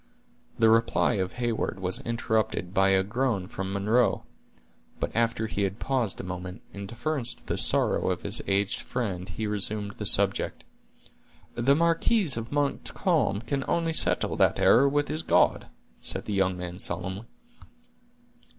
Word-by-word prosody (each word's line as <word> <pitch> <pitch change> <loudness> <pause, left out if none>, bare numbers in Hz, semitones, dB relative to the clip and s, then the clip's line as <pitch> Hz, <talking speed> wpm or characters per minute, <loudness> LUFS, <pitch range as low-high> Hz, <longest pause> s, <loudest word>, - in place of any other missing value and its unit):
The 110 -1 +5
reply 115 +2 +3
of 95 - -3
Heyward 120 -5 -2
was 95 -1 0
interrupted 110 -6 -1
by 95 0 +4
a 95 0 +3
groan 110 -2 -1
from 95 0 -5
Munro; 105 +5 +1 0.7
but - - -3
after 115 -1 +1
he 105 -2 -3
had 100 0 -1
paused 125 -7 -1
a - - -5
moment, 90 0 -7
in 100 0 -7
deference 120 +1 -2
to - - -17
the - - -2
sorrow - - +2
of - - -2
his - - 0
aged 100 0 +1
friend 95 -7 -4
he 85 +7 -4
resumed 105 0 -1
the 105 0 -3
subject. 100 0 +1 0.9
"The 125 +4 +3
marquis 170 +5 +2
of 115 0 -5
Montcalm 145 - 0
can 135 +3 -2
only 165 -1 0
settle - - +2
that - - +3
error 135 +4 +5
with 145 +1 0
his 155 +1 -2
God," - - +2 0.3
said - - -3
the 105 - -3
young 95 -2 +1
man 90 0 -6
solemnly. 95 +5 -2
110 Hz, 155 wpm, -27 LUFS, 95-125 Hz, 0.9 s, The